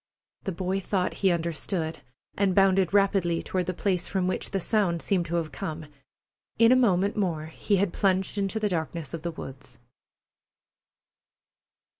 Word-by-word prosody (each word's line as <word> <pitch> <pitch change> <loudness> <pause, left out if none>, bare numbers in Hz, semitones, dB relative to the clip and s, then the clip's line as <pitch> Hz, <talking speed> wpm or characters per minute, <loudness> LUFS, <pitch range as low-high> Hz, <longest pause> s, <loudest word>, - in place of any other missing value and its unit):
The 195 - -1
boy 185 +2 -2
thought 190 -1 -1
he 195 - +4
understood, 170 0 -1 0.4
and 195 -2 +1
bounded 195 -2 +4
rapidly 195 -4 +2
toward 180 -2 -2
the 185 - -1
place 185 -3 0
from 190 -2 -1
which 185 - -1
the 195 - -1
sound 185 -3 +1
seemed 175 -1 0
to 170 - -2
have 165 -3 -1
come. 160 -4 -5 0.7
In 230 +1 +6
a - - +7
moment 200 -5 +3
more 170 -7 -1
he 160 +6 -1
had 195 -2 +1
plunged 190 -1 +1
into 200 +1 -1
the 210 -1 0
darkness 160 -3 -3
of 165 - -4
the 170 - -3
woods. 135 -5 -9
185 Hz, 160 wpm, -27 LUFS, 170-195 Hz, 0.7 s, a